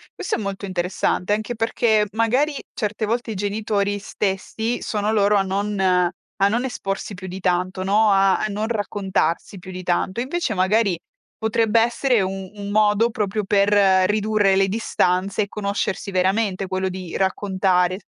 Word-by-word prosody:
Questo 385 - -2
è - - -3
molto 200 0 -4
interessante 185 +1 -1
anche 215 +3 -2
perché 220 -1 +2
magari 245 +7 +1 0.2
certe 215 -1 -2
volte 230 +1 -2
i 215 - -4
genitori 205 0 -1
stessi 210 +4 -2
sono 210 0 -1
loro 210 -1 +3
a - - +3
non 200 +2 -2 0.6
a 195 - +5
non 235 +4 0
esporsi 200 -5 -4
più 185 +1 -9
di 185 +1 -6
tanto, 185 +1 0
no, 205 +2 +3
a 195 0 +4
a - - -1
non 210 +1 -2
raccontarsi 200 -4 -1
più 185 +1 -10
di 185 0 -7
tanto. 185 +4 -1
Invece 275 -1 -2
magari 195 0 +2 0.4
potrebbe 220 0 +2
essere 240 0 +2
un 190 0 -4
un 200 -1 -7
modo 210 +2 +3
proprio 210 -1 -2
per 200 0 +3 0.4
ridurre 210 -2 +2
le 195 0 +3
distanze 195 -1 0
e - - -6
conoscersi 200 -1 -3
veramente, 190 +1 0
quello 190 0 -1
di 185 -2 -7
raccontare. 190 -1 +1
200 Hz, 160 wpm, -22 LUFS, 190-220 Hz, 0.6 s, a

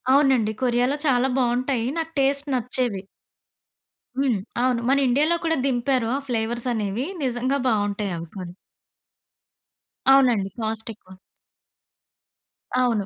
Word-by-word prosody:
అవునండి. 265 -5 +4
కొరియాలో 250 +2 +2
చాలా 255 -1 +3
బాగుంటాయి. 250 -1 0
నాకు 325 0 -3
టేస్ట్ 280 +1 +2
నచ్చేవి. 245 -4 0 1.2
హ్మ్. 260 -7 +1 0.2
అవును 250 -1 +2
మన 275 - +4
ఇండియా‌లో 295 +7 +3
కూడా 325 -1 +1
దింపారు. 255 -2 +1
ఆ - - 0
ఫ్లేవర్స్ 235 0 -2
అనేవి 215 +3 -2 0.2
నిజంగా 255 +2 0
బాగుంటాయి 205 -3 0
అవి 165 0 -7
కొన్ని. 180 -3 -7 1.6
అవునండి. 245 -8 +4
కాస్టెక్కువ. 220 -3 -5 1.7
అవును. 230 -5 +1
245 Hz, 105 wpm, -23 LUFS, 220-270 Hz, 1.7 s, అవునండి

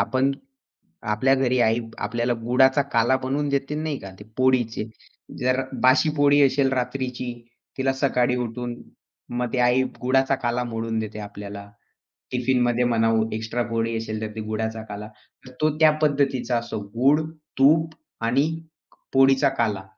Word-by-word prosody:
आपण 130 +6 +1 0.8
आपल्या 130 +6 +3
घरी 130 -1 +1
आई 115 +2 +2 0.2
आपल्याला 120 +3 -1
गुळाचा 130 +4 +4
काला 115 +3 +3
बनवून 140 +2 -1
देतील 140 +2 -1
नाही 155 -3 -2
का 95 - -9
ते - - -10
पोळीचे. 120 -4 +1 0.5
जर 130 +1 +1 0.2
बाशी 130 +4 +5
पोळी 145 0 +5
असेल 135 0 +2
रात्रीची, 125 -1 -3 0.4
तिला 135 0 +1
सकाळी 125 -2 +1
उठून 120 0 -4 0.6
मग 125 - 0
ती - - 0
आई 125 +2 +3 0.2
गूळाचा 135 +2 +2
काला 125 -2 -1
मोडून 115 -1 -3
देते 105 -1 -5
आपल्याला. 100 0 -9 0.6
टिफिनमध्ये 125 -1 +1
म्हणा 115 -2 +2 0.3
एक्स्ट्रा 110 +2 -2
पोळी 115 0 -1
असेल, 110 -1 -4
तर 110 - -2
ते 110 - -4
गूळाचा 110 +1 -3
काला 105 +1 -6 0.4
तर 130 - -12
तो 155 - +4
त्या 155 -1 +7
पद्धतीचा 140 -4 +1
असो 115 -2 -4 0.2
गूळ, 140 +6 +4 0.4
तूप 155 +4 +4 0.3
आणि 135 +6 +2 0.4
क - - -25 0.2
पोळीचा 135 +1 +5
काला 105 -4 0
125 Hz, 145 wpm, -24 LUFS, 115-135 Hz, 0.8 s, त्या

